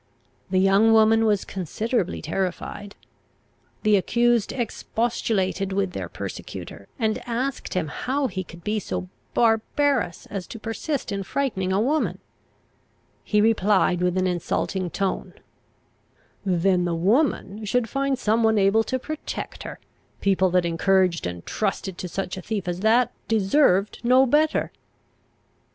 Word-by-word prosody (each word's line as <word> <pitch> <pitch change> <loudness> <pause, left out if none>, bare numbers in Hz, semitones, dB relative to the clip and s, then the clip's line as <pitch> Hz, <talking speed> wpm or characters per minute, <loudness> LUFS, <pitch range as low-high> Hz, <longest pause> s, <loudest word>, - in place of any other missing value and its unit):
The 190 - +1
young 195 +4 +5
woman 225 0 +5
was 205 -3 +2
considerably 195 - -2
terrified. 190 +4 -4 0.9
The 210 -2 +5
accused 235 +3 +2
expostulated 220 -5 -1
with 195 -1 0
their - - -5
persecutor, - - -7
and 220 -3 0
asked 250 +1 -3
him 180 -4 0
how 270 - -2
he 190 -6 -3
could 170 -1 -13
be 215 0 0
so 185 -1 -4 0.3
barbarous 230 - +1
as 195 -3 -4
to 230 - -8
persist 230 +4 -3
in 200 0 -2
frightening 195 -3 -1
a 190 - +2
woman? 290 +8 +1 1.1
He 210 -1 +2
replied 205 -4 +3
with 180 0 +1
an 185 - +2
insulting 180 +1 -1
tone, 195 +2 -3 1.1
"Then 180 -1 +2
the 170 -1 -1
woman 210 - +1
should 235 +3 +1
find 275 +2 0
some 225 -1 +1
one 220 -1 +3
able 200 +3 +4
to 260 - -1
protect 310 +4 -6
her; - - -7 0.4
people 190 -1 +2
that 180 0 +2
encouraged 175 - +2
and 90 -1 -7
trusted 195 -3 -2
to 180 - -4
such 185 +1 -4
a - - -5
thief 205 -2 -4
as 175 0 -2
that, 230 +4 +3 0.2
deserved 205 -2 +3
no 255 +2 +5
better!" 300 +4 +2
205 Hz, 135 wpm, -24 LUFS, 185-230 Hz, 1.1 s, young